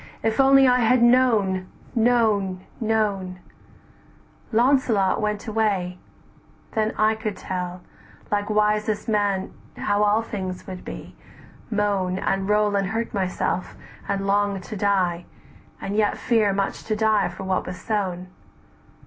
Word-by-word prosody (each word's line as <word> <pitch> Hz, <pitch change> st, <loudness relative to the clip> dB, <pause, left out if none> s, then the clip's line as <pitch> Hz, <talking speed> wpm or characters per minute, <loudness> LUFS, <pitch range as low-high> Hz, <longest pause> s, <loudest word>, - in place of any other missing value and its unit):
if 220 Hz, +2 st, 0 dB
only 270 Hz, 0 st, +6 dB
I 250 Hz, 0 st, +4 dB
had 240 Hz, +1 st, +4 dB
known, 220 Hz, -7 st, +3 dB, 0.3 s
known, 220 Hz, -6 st, +1 dB
known;' 210 Hz, -5 st, -1 dB, 1.1 s
Launcelot 230 Hz, -5 st, +2 dB
went 210 Hz, -1 st, -2 dB
away, 200 Hz, -5 st, -1 dB, 0.7 s
then 220 Hz, 0 st, 0 dB
I 215 Hz, +1 st, +3 dB
could 220 Hz, -2 st, -4 dB
tell, 180 Hz, -1 st, -5 dB, 0.5 s
"Like 205 Hz, 0 st, 0 dB
wisest 210 Hz, 0 st, +1 dB
man 205 Hz, -3 st, 0 dB, 0.2 s
how 205 Hz, 0 st, 0 dB
all 210 Hz, +2 st, +3 dB
things 185 Hz, -5 st, -5 dB
would 185 Hz, -1 st, -8 dB
be, -, -, -9 dB, 0.5 s
moan, 200 Hz, -4 st, 0 dB
And 195 Hz, +1 st, -1 dB
roll 210 Hz, -1 st, +2 dB
and 195 Hz, -1 st, +1 dB
hurt 225 Hz, +3 st, -3 dB
myself, 185 Hz, -2 st, -2 dB, 0.3 s
and 195 Hz, 0 st, -1 dB
long 200 Hz, 0 st, +1 dB
to 215 Hz, -, -8 dB
die, 185 Hz, -4 st, 0 dB, 0.5 s
And 200 Hz, -, -4 dB
yet 210 Hz, -1 st, +1 dB
fear 225 Hz, -4 st, +2 dB
much 195 Hz, 0 st, -2 dB
to 215 Hz, -, -1 dB
die 215 Hz, -2 st, +2 dB
for 185 Hz, +2 st, -8 dB
what 190 Hz, -1 st, -1 dB
was 180 Hz, 0 st, -6 dB
sown. 185 Hz, -4 st, -2 dB
205 Hz, 130 wpm, -23 LUFS, 190-220 Hz, 1.1 s, only